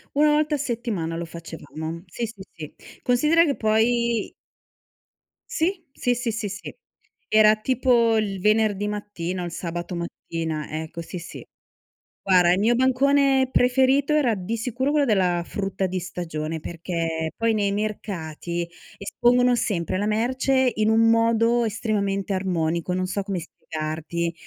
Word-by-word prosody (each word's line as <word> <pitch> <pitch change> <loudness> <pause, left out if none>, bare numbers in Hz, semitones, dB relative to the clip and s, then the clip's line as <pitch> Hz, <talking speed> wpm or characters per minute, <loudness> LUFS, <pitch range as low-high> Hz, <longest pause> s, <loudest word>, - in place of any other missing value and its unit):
1 300 +1 +5
volta 300 0 +2
a - - -1
settimana 230 - -3
lo 170 - -4
facevamo. 165 0 -7
Sì, 230 +7 -4
sì, 220 -3 -10
sì. 155 -4 -9 0.3
Considera 300 +7 +4
che 285 -4 0
poi 230 +1 +1 1.2
Sì, 350 +2 -1
sì, 245 -2 0
sì, 240 -1 -2
sì, 220 -1 -3
sì. 195 - -8 0.5
Era 215 0 +6
tipo 235 -1 +2
il 200 -3 -1
venerdì 210 0 +2
mattino, 185 -4 -4
il 175 - -5
sabato 170 +1 -5
mattina, 165 -2 -4
ecco 160 +1 -7
sì, 175 +2 -7
sì. 175 - -9 0.8
Guarda, 180 -2 +4
il 185 - +1
mio 230 +4 +3
bancone 265 +1 +3
preferito 265 +4 +3
era 285 -6 +3
di 190 +4 -3
sicuro 250 +4 -1
quello 295 -1 +3
della 185 -7 +2
frutta 195 0 -2
di 185 0 -2
stagione, 165 -3 -4
perché, 165 -1 -3
poi 230 0 +1
nei 205 -2 +1
mercati 175 -5 -3 0.3
espongono 245 +4 +3
sempre 185 -7 -1
la 205 - -1
merce 255 +4 +1
in 215 0 +2
un 225 +1 +4
modo 230 +1 +3
estremamente 200 -3 -1
armonico, 170 -2 -1
non 185 0 0
so 190 +2 -2
come 195 -2 -3
spiegarti. 160 +1 -4
210 Hz, 140 wpm, -24 LUFS, 175-240 Hz, 1.2 s, Era